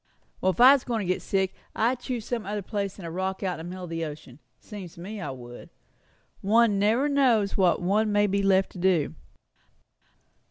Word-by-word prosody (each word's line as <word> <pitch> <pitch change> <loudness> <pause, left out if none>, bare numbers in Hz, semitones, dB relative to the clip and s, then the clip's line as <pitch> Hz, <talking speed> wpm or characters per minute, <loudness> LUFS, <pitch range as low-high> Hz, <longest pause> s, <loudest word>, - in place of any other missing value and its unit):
"Well, 185 - +2
if 185 - -10
I 255 +3 +9
was 280 - +1
going 230 -3 -2
to 185 - +3
get - - -7
sick, 190 -1 0 0.2
I'd 235 +3 +1
choose 245 -3 -4
some 240 -3 -3
other 205 0 -4
place 200 -1 -3
than 190 - -10
a 165 - -5
rock 190 +3 -3
out 185 -3 -2
in 160 - -7
the - - -6
middle 185 0 -7
of 175 - -7
the 165 0 -2
ocean. 150 -4 -8 0.2
Seems 195 -6 -10
to - - -14
me 200 +4 -7
I - - -4
would. 120 -2 -10 0.7
One 215 0 +3
never 225 +8 +2
knows 250 -8 +2
what 185 -2 +2
one 210 +4 +2
may 205 0 +3
be 200 0 0
left 195 -1 +2
to 185 - -10
do." 175 -5 +2
195 Hz, 215 wpm, -26 LUFS, 180-220 Hz, 0.7 s, I